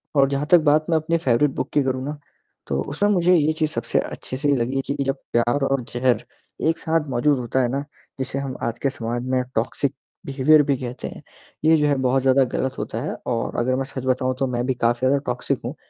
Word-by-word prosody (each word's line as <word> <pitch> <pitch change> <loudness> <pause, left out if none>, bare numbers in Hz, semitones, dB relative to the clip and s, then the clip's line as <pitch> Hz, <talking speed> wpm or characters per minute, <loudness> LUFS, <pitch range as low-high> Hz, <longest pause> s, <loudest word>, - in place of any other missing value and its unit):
और 135 -1 +5
जहाँ 140 +1 -1
तक 175 - +9
बात 155 +1 +3
मैं 160 - +4
अपनी 165 +2 0
फ़ेवरेट 135 -1 +2
बुक - - -2
की 145 - +3
करूँ 130 0 -1
ना, 150 +1 -4 0.5
तो 70 0 -1
उसमें 200 +9 0
मुझे 180 -2 +4
ये 155 -1 +3
चीज़ 155 -1 -1
सबसे - - 0
अच्छे 130 - -5
से 145 0 +2
लगी 130 +3 0
कि 140 - -1
जब 135 +1 0 0.2
प्यार 120 +4 +2
और 135 -2 0
ज़हर 125 0 +1 0.5
एक 165 - 0
साथ 160 -2 0
मौजूद 135 +3 +2
होता 125 +2 0
है 120 - +2
ना 140 +1 -1 0.4
जिसे 130 +1 -2
हम 135 -2 -4
आज 115 0 -2
के 140 - +1
समाज 120 -2 -4
में 130 -1 +2
टॉक्सिक 125 +4 0 0.3
बिहेवियर 145 +3 +4
भी 140 -1 +1
कहते 125 0 -6
हैं। - - -9 0.4
ये 160 - +6
जो 150 0 +2
है 145 - +3
बहुत 130 +1 +2
ज़्यादा 135 0 +4
गलत 130 0 -2
होता - - -4
है - - -3
और 115 -2 -2
अगर 130 +2 +1
मैं 135 - -1
सच 130 -1 -6
बताऊँ 130 0 +1
तो 135 - +1
मैं 120 0 -1
भी 130 - +1
काफ़ी 120 0 +1
ज़्यादा 140 +1 +3
टॉक्सिक 125 0 -1
हूँ - - -4
135 Hz, 235 wpm, -23 LUFS, 125-145 Hz, 0.5 s, तक